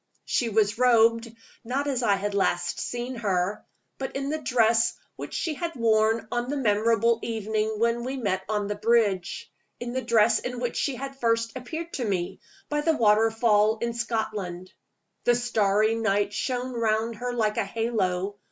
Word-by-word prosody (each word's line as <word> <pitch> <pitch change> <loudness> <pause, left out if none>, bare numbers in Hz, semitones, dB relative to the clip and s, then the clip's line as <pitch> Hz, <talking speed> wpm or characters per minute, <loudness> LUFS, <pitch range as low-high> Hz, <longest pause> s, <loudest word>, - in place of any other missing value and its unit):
She 240 - 0
was 215 0 +1
robed, 230 -2 +4 0.3
not 260 +5 -2
as 270 -3 -1
I 205 -4 +3
had 205 +1 -3
last 175 -3 0
seen 245 +1 -4
her, 200 -2 -1 0.4
but 265 - -5
in 275 +1 -2
the 310 - -1
dress 230 -3 +3 0.2
which - - -7
she 325 - -1
had 335 +2 -4
worn 225 -1 +2
on 240 +1 -1
the 290 - -1
memorable 230 0 +2
evening 220 -1 -2
when 235 +1 +1
we 260 +2 -3
met 195 -6 -1
on 210 -1 0
the 205 - -2
bridge 205 -4 0 0.3
in 240 0 -5
the 260 - -1
dress 225 -2 +3
in 250 0 -5
which 245 -1 -2
she 280 - -1
had 270 +2 -7
first 230 -1 +1
appeared 320 +7 -6
to 260 - -2
me, 185 -5 -2 0.3
by 295 0 -1
the 320 0 +1
waterfall 220 0 +3
in 235 +1 -2
Scotland. 215 -6 -3 0.5
The 240 - +4
starry 215 -2 +2
light 205 -2 0
shone 255 +1 -2
round 225 -1 0
her 245 +1 -3
like 220 -3 0
a - - +2
halo. 200 -3 -1
230 Hz, 170 wpm, -26 LUFS, 210-245 Hz, 0.5 s, robed